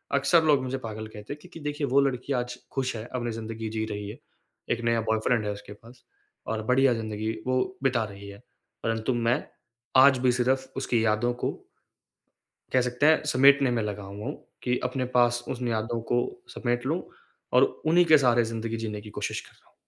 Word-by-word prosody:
अक्सर 150 +4 +4
लोग 145 -4 +4
मुझे 130 +1 -2
पागल 110 -3 -6
कहते 105 +4 -8
हैं 145 - -10
क्योंकि 180 -2 -12
देखिए 145 -1 -2
वो 135 +2 +4
लड़की 135 0 -1
आज 125 -1 -2
खुश 130 -2 -2
है, 110 - -5
अपनी 120 -1 -3
ज़िंदगी 110 0 -5
जी 110 0 -2
रही 105 -1 -5
है। 105 - -8 0.5
एक - - 0
नया 115 -1 +2
बॉयफ्रेंड 110 +1 +1
है 105 - -1
उसके 100 0 -9
पास 120 +4 -17 0.4
और 110 -1 -2
बढ़िया 130 +1 +4
ज़िन्दगी 110 -1 -3 0.2
वो 130 +9 0
बिता 125 -4 +2
रही 100 -1 -9
है। 100 - -10 0.5
परंतु 115 +2 0
मैं 120 +1 +1 0.6
आज 135 -1 +7
भी 125 0 +3
सिर्फ 130 +2 0
उसकी 120 -4 +1
यादों 110 +3 +2
को - - +1 1.2
कह 130 - +5
सकते 125 +3 0
हैं 160 +1 +6
समेटने 140 -1 +5
में 120 -2 +1
लगा 105 -1 -4
हुआ 100 +2 -8
हूँ - - -3 0.3
कि 125 0 +1
अपने 125 0 -1
पास 120 0 +3
उस 125 - -4
न 125 - -1
यादों 115 +1 -1
को 120 - +4 0.4
समेट 120 0 -1
लूँ 160 +6 0 0.6
और - - +7 0.2
उन्हीं 175 +2 +5
के 160 -2 +7
सहारे 120 -4 +4
ज़िन्दगी 115 0 -3
जीने 105 -2 -4
की 105 - -11
कोशिश - - -2
कर - - -17
रहा - - -28
हूँ। - - -29
120 Hz, 200 wpm, -27 LUFS, 110-130 Hz, 1.2 s, आज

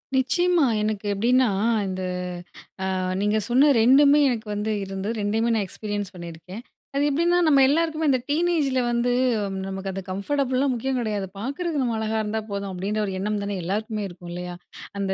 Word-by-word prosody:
நிச்சயமா. 320 +5 +3 0.2
எனக்கு 215 -1 -2
எப்படின்னா 245 +5 +3 0.4
இந்த 185 0 -4 0.8
அ - - -1 0.3
நீங்க 210 +1 +2
சொன்ன 265 +5 +5
2மே 280 +4 +6
எனக்கு 230 -3 -2
வந்து 210 +1 -2
இருந்து, 195 +1 -5
2டையுமே 220 +3 0
நான் 210 -3 0
எக்ஸ்பீரியன்ஸ் 205 -1 -5
பண்ணியிருக்கேன். 170 +4 -9 0.3
அது 280 +1 +2
எப்படின்னா 340 +5 +2
நம்ம 285 -3 +5
எல்லாருக்குமே 320 +1 +1
இந்த 260 -2 +2
டீனேஜில 300 -4 +1
வந்து 240 +1 +1 0.6
நமக்கு 195 0 -4
அது 195 +1 -5
கம்ஃபர்டபுள்லாம் 260 +6 0
முக்கியம் 260 +2 -2
கெடையாது! 210 -4 -2
பார்க்குறது 290 - -2
நம்ம 235 -3 0
அழகா 220 0 -1
இருந்தா 215 +1 -2
போதும், 200 -1 -3
அப்படின்ற 195 +4 -2
ஒரு 195 - -4
எண்ணம் 210 +1 -1
தானே 200 0 -3
எல்லாருக்குமே 210 +3 -2
இருக்கும் 175 -1 -11
இல்லையா? 180 0 -6 0.4
அந்த 195 -1 -1
220 Hz, 160 wpm, -24 LUFS, 200-275 Hz, 0.8 s, 2மே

